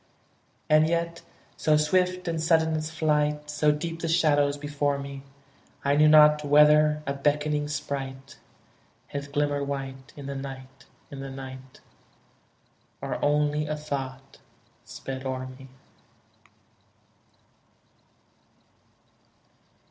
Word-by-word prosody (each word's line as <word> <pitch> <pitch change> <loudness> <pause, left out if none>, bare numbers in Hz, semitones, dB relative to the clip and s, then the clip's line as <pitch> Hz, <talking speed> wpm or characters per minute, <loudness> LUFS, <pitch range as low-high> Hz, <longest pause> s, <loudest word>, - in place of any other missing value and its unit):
And 155 0 +5
yet 170 0 -1 0.3
so 155 -1 +2
swift 180 +4 +1
and 165 -1 -1
sudden 160 -1 +3
its 155 0 -3
flight, 150 -2 0
So 150 0 +3
deep 165 +2 -4
the 165 - -3
shadows 145 -4 +2
before 145 -1 -1
me, 140 0 -7 0.6
I 140 +1 +3
knew 155 +1 +5
not 150 0 +7
whether 150 +1 +5
a 140 - -1
beckoning 150 +1 0
sprite 135 -2 -5 0.7
Had 140 0 -6
glimmered 145 -1 0
white, 135 -1 -6
in 140 - -8
the 140 - -4
night, 135 -1 -8 0.3
in 140 - -8
the 135 0 -6
night, 130 -1 -10 1.2
Or - - -4
only 150 +1 +1
a 155 0 -2
thought 135 -3 -6 0.5
sped 130 0 -7
o'er 130 -1 -3
me. 130 +1 -11
145 Hz, 110 wpm, -26 LUFS, 140-155 Hz, 1.2 s, not